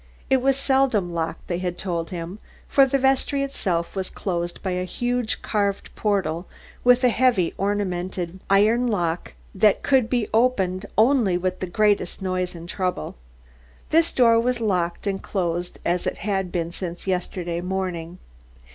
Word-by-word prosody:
It 265 -1 +4
was 270 +1 +2
seldom 265 -10 +2
locked, 165 -1 -3
they 175 -1 -2
had 180 -1 -3
told 170 -4 -2
him, 175 +3 -6 0.3
for 275 -1 +5
the 275 - +2
vestry 270 +1 +2
itself 180 -11 -2
was 190 -1 -2
closed 175 -2 -3
by 190 - -1
a 180 0 -1
huge 245 +5 -2
carved 200 -2 -1
portal 195 -5 -1 0.4
with 250 +1 +5
a 250 - +6
heavy 230 -8 +2
ornamented 185 -3 -2
iron 215 +5 +4
lock 175 -6 -1 0.2
that 205 +1 +3
could 260 -5 +3
be 240 -4 +1
opened 205 -5 +2
only 220 -5 +4
with 185 +1 -2
the 185 - -3
greatest 205 -1 +1
noise 185 -1 -2
and 170 0 -9
trouble. 180 - -2 0.8
This 330 +1 +4
door 230 -2 +5
was 245 +1 0
locked 180 -6 -1
and 195 -1 -1
closed 175 -2 -2
as 175 +1 0
it - - -2
had 190 -3 -1
been 170 -1 -2
since 175 -1 -6
yesterday 180 -2 -2
morning. 180 -2 -3
190 Hz, 155 wpm, -24 LUFS, 175-230 Hz, 0.8 s, a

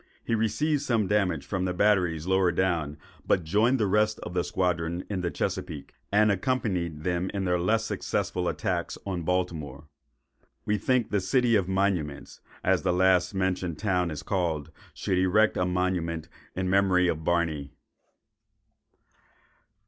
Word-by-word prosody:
He - - -2
received 115 +7 +1
some 115 -4 +1
damage 95 -7 0
from 95 -2 -2
the 90 -1 -2
batteries 90 -6 +2
lower 95 -1 +3
down, 85 -5 0 0.3
but 90 - +2
joined 110 +10 +2
the 110 - +2
rest 105 +2 +2
of 90 - -7
the 90 -1 +1
squadron 85 -1 -1
in 95 -3 -1
the 85 - -1
Chesapeake, 75 -3 -4 0.2
and 105 +1 +4
accompanied 95 - -1
them 90 +1 -1
in 95 -1 -1
their 90 -1 +1
less 110 +5 +1
successful 90 -4 -2
attacks 90 -4 -2
on 95 -3 -3
Baltimore. 80 -5 -2 0.8
We 105 0 0
think 125 +1 +1
the 100 -2 +1
"City 120 +4 +2
of 95 -4 +2
Monuments," 90 -7 -1 0.2
as - - +2
the - - +1
last 90 +1 +3
mentioned 90 -3 -1
town 90 -4 0
is 75 -3 -6
called, 80 -6 -1 0.2
should 95 -2 0
erect 100 +4 +3
a 90 - 0
monument 90 -3 -1
to - - -22 0.3
the 95 - -2
memory 95 -1 +3
of 80 -2 -1
Barney. 80 -4 0
90 Hz, 155 wpm, -27 LUFS, 85-100 Hz, 0.8 s, and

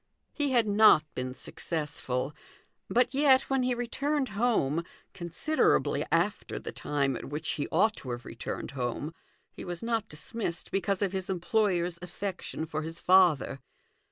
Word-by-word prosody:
He 290 -2 0
had 240 -4 +3
not 205 -6 +7
been 125 0 -4
successful, 150 -5 -3 0.6
but 245 +1 +3
yet, 270 -1 +4
when 270 -1 +3
he 250 0 +1
returned 275 +4 -1
home 200 - +1 0.3
(considerably 180 - +1
after - - 0
the - - -6
time 140 -2 -1
at - - -6
which 150 +3 -4
he 145 - -2
ought 215 +7 +3
to 130 - -7
have 120 -1 -5
returned 115 - -5
home) 135 +4 -3 0.4
he - - -9
was 175 0 -5
not 230 -2 -1
dismissed 170 +3 -4
because 195 0 0
of 195 - 0
his 190 -1 -4
employer's 180 -2 +1
affection 180 -2 -4
for 155 -1 -3
his 165 +1 -6
father. 175 -7 +4
180 Hz, 150 wpm, -29 LUFS, 150-230 Hz, 0.6 s, not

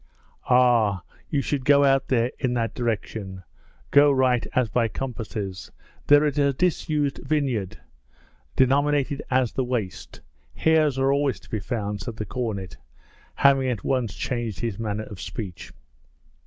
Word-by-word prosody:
'Ah, 120 -7 +4 0.3
you 145 -3 +1
should 140 -1 -2
go 140 +1 +5
out 135 -1 +3
there 120 -1 +1
in 125 -2 0
that 115 -2 -1
direction, 105 -5 -4 0.5
go 145 +1 +6
right 130 -3 +2
as 125 -2 +3
by 115 +1 +1
compasses, 110 -6 -5 0.4
there 145 +1 +6
in 145 0 0
a 140 -1 +3
disused 150 -2 0
vineyard 130 -9 -1 0.8
denominated 140 +1 +2
as 130 -3 +2
the 130 - 0
Waste, 120 -7 -4 0.4
hares 155 -4 +2
are 135 +1 +2
always 140 -7 0
to - - -20
be 110 - -1
found,' 105 -2 -3
said 115 +1 -6
the 110 - -4
cornet, 100 -5 -4 0.6
having 135 -1 +4
at 120 -5 -3
once 125 -6 -1
changed 115 -6 -3
his 115 -4 -3
manner 110 -1 -3
of 100 -4 -10
speech. 95 -1 -7
125 Hz, 145 wpm, -24 LUFS, 110-140 Hz, 0.8 s, go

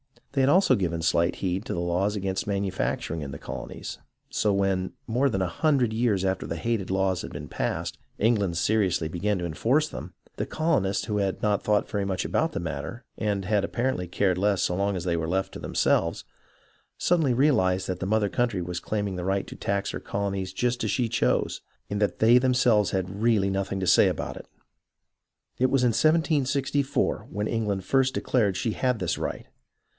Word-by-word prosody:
They 140 - +1
had 130 - +4
also 185 +6 +5
given 85 -4 -1
slight 85 +1 +2
heed 95 +1 -2
to - - -3
the 85 - -2
laws 90 +4 0
against 95 -1 -2
manufacturing 95 -5 -2
in 70 -2 -5
the 70 - -6
colonies, - - -7 0.3
so 105 - +1
when, 95 -1 0
more 125 +5 +2
than 95 -6 -1
a - - 0
hundred 130 - +1
years 110 -4 +1
after 95 0 -1
the 85 - -3
hated 105 +2 -2
laws 95 -1 +1
had - - -7
been - - -7
passed, - - -3 0.2
England 100 -6 +1
seriously 95 -5 +1
began 100 +5 -1
to 90 - -3
enforce 130 - +1
them, - - -8 0.2
the - - -1
colonists, 140 - 0
who 105 - -1
had 100 -2 -1
not 105 -1 +2
thought 105 -1 +1
very 100 -1 -1
much 95 -2 -1
about - - 0
the - - -2
matter, 120 +1 -5
and 100 -3 -1
had 105 0 +2
apparently 120 -7 -1
cared 90 +1 +1
less 100 -1 +2
so - - +1
long 100 +1 0
as 90 - -3
they 85 -1 0
were 80 -1 -2
left 95 +3 -1
to - - -7
them - - -7
selves, 85 0 +2 0.7
suddenly 160 -8 +2
realized 95 -9 +3
that 95 - -3
the 95 - -3
mother 105 0 +2
country 115 -4 0
was 90 0 -4
claiming 100 -1 -2
the 90 - -4
right 95 0 0
to - - -9
tax 100 0 -1
her - - -4
colonies 100 -2 -3
just 125 +4 0
as 110 - 0
she 120 +3 0
chose, 115 - 0 0.3
and 105 0 -2
that 105 - 0
they 115 +2 +6
themselves 125 -5 +3
had 95 +2 -3
really 110 -4 +3
nothing 95 0 -2
to - - 0
say - - +6
about - - -3
it. - - -11 1.1
It 130 +1 +3
was 135 -1 +2
in 125 - +5
1764, 140 0 +1
when 105 +2 -2
England 105 -4 -1
first 135 +4 +2
declared 105 -7 +1
she 115 - -1
had 125 +2 0
this 90 -4 -1
right. - - -4
100 Hz, 200 wpm, -26 LUFS, 95-120 Hz, 1.1 s, they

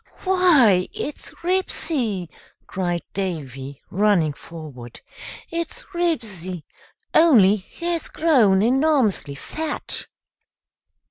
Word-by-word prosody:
"Why, 305 - +4
it's 295 - -6
Ribsy!" 290 - 0 0.4
cried 175 -2 -2
Davy, 140 -8 -5
running 190 -6 +2
forward. 150 -7 -11 0.5
"It's 335 0 -4
Ribsy, 210 - -2 0.5
only 225 - +6
he's 335 - -4
grown 230 -12 +3
enormously 255 - +2
fat." 310 - -4
210 Hz, 75 wpm, -22 LUFS, -, 0.5 s, only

